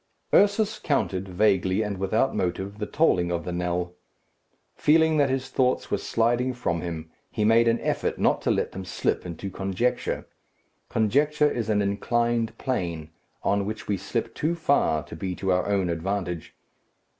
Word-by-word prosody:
Ursus 205 +2 +4
counted, 95 -10 -1
vaguely 95 +1 +2
and 100 -3 -4
without 110 +7 +1
motive, 95 +3 -2
the 105 - -3
tolling 90 - +2
of 85 -1 -2
the 90 - -3
knell. 90 0 -2 0.8
Feeling 160 +1 +3
that 140 -2 +3
his 130 0 -2
thoughts 130 -1 0
were - - +1
sliding 120 +2 +1
from 85 -9 -1
him, 80 -2 -5 0.2
he 105 -2 -1
made 115 +2 +5
an 115 0 +3
effort - - -1
not - - +2
to - - -1
let - - +1
them 95 - -6
slip 90 0 -1
into 90 +3 -6
conjecture. 95 +6 -1 0.6
Conjecture 145 +7 +2
is 115 -2 -2
an 105 -1 +2
inclined 115 +3 0
plane, 85 - -3 0.3
on 100 0 +2
which 110 +2 -5
we 105 - +1
slip 100 +5 -3
too 160 +3 -1
far 140 - +2
to - - -10
be 90 +2 -4
to 95 +1 -1
our 90 +1 +1
own 100 -3 +1
advantage. 90 0 -3
100 Hz, 165 wpm, -26 LUFS, 90-125 Hz, 0.8 s, made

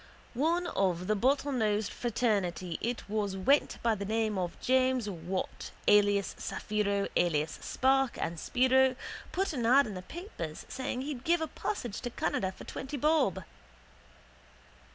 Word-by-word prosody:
One 330 +8 +1
of 185 - 0
the 215 +2 +1
bottlenosed 230 -4 +1
fraternity 200 -8 -1
it 240 +1 -3
was 205 -2 -1
went 275 +10 +3
by 230 -1 +3
the 200 -2 -4
name 220 +1 0
of 180 -2 -3
James 255 -2 +2
Wought 185 0 -4 0.2
alias 205 -1 +4
Saphiro 200 -1 -1
alias 160 -3 +1
Spark 265 0 +2
and 165 0 -2
Spiro, 260 +3 +3 0.4
put 385 -2 -1
an 240 -5 0
ad 270 +4 +6
in 215 - -5
the 185 - -6
papers 180 - -7
saying 255 -1 -3
he'd 275 -3 -5
give 340 +3 +3
a 320 - 0
passage 245 - -4
to 245 - -3
Canada 190 -4 -1
for - - -12
twenty 270 +2 -5
bob. 305 +4 +2
225 Hz, 145 wpm, -31 LUFS, 195-265 Hz, 0.4 s, ad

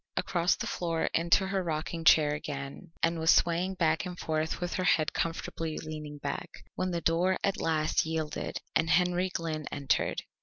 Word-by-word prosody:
Across 175 0 +2
the - - -4
floor 165 -2 -1
into 170 +3 +3
her 195 0 -1
rocking 165 0 -3
chair 150 -2 +6
again, 145 +3 -6
and 165 0 +2
was 160 0 +1
swaying 175 +3 +3
back 165 +2 +2
and 180 -2 -6
forth 155 -1 -2
with 175 0 -3
her 185 - -1
head 160 -3 +2
comfortably 165 -1 -3
leaning 155 -2 -6
back, 140 -1 -4 0.2
when 185 - -1
the 170 -1 -2
door 175 +3 +2
at 200 - 0
last 155 -1 +1
yielded 160 -1 -3 0.2
and 160 +1 +2
Henry 180 +1 +3
Glynn 160 -4 -3
entered. 140 -2 0
165 Hz, 175 wpm, -30 LUFS, 155-175 Hz, 0.2 s, chair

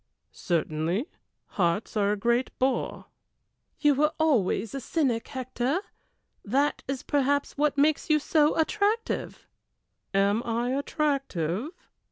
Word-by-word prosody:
"Certainly 165 - -1 0.4
hearts 180 +4 -1
are 205 -1 +2
a 210 - 0
great 235 +4 +1
bore." 260 +1 -1 0.7
"You 295 -1 +4
were 300 +3 +2
always 230 -9 +1
a 275 - -3
cynic, 260 -4 -1
Hector; 255 +3 -2 0.6
that 275 +7 +1
is 270 -1 -3
perhaps 285 0 0
what 290 0 +1
makes 300 +2 +2
you 310 - +5
so 305 0 +2
attractive." 420 +7 0 0.7
"Am 200 +2 +2
I 235 +2 -1
attractive?" 275 - -1
265 Hz, 115 wpm, -27 LUFS, 210-295 Hz, 0.7 s, you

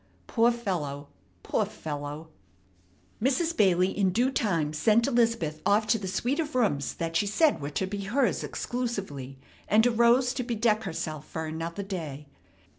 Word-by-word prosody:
Poor 230 - +3
fellow, 155 -12 -3 0.3
poor - - +1
fellow!" 150 +1 -6 0.9
Mrs. 320 +7 +1
Bailey 185 - +3
in 195 -2 +2
due 240 +8 +1
time 170 - 0
sent 220 +8 +3
Elizabeth 230 -10 +1
off 205 +2 +3
to 215 +1 +2
the 195 - -5
suite 240 - -1
of 310 -3 -2
rooms 195 - +1
that 165 0 -3
she 205 +5 +2
said 290 - +3
were 140 - -3
to 170 +6 -1
be 200 +1 -5
hers 245 +5 +1
exclusively, 195 - -4 0.3
and 220 +2 +4
arose 245 +2 +4
to 265 - -2
bedeck 225 -2 +1
herself 155 -4 -4
for 160 0 -4
another 165 +4 -4
day. 160 -7 -5
200 Hz, 155 wpm, -28 LUFS, 160-235 Hz, 0.9 s, and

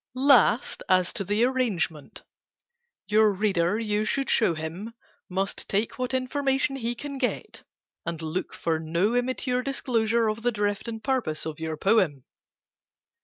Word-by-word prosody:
"Last, 260 -3 +4
as 185 -1 +3
to - - -2
the 205 +4 +1
arrangement: 220 - -1 0.8
Your 215 0 +4
reader, 195 -2 +1
you 210 -2 0
should 275 +5 0
show 195 -7 +3
him, 170 +9 -6 0.3
Must 190 +2 -2
take 210 +6 -1
what 255 +1 -1
information 270 +1 0
he 240 -2 -2
Can 280 +2 -6
get, 250 - -3 0.4
and 165 -1 -4
look 160 +3 -3
for 165 -1 -1
no 170 +8 0
im 245 0 +1
mature 255 -1 -1
disclosure 235 -4 +1
of 215 +1 -2
the 245 +1 +1
drift 205 0 -2
And 225 -1 -6
purpose 250 - -1
of 160 -1 -5
your 160 -1 -4
poem. 185 - +2
215 Hz, 150 wpm, -26 LUFS, 180-250 Hz, 0.8 s, Last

